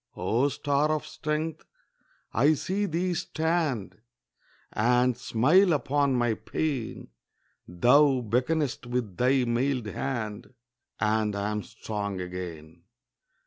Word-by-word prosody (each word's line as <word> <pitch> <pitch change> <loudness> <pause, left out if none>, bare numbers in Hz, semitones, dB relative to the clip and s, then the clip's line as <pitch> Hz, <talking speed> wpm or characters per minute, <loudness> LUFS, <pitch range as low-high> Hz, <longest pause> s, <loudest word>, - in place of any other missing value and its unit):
O 115 +9 +1
star 145 +1 0
of 155 -1 -1
strength! 155 +1 -3 0.7
I 145 +8 +4
see 200 +7 -1
thee 180 +2 -1
stand 160 - -1 0.7
And 125 +2 +3
smile 165 - +3
upon 140 -1 +1
my 120 -2 +2
pain; 135 0 -3 0.6
Thou 130 +9 +4
beckonest 125 +4 -1
with 120 -7 -3
thy 130 +1 +3
mailed 125 +1 0
hand, 110 +1 -4 0.4
And 110 -1 +1
I 100 +1 -1
am 105 0 -2
strong 100 -2 -5
again. 85 -3 -7
125 Hz, 105 wpm, -27 LUFS, 105-150 Hz, 0.7 s, I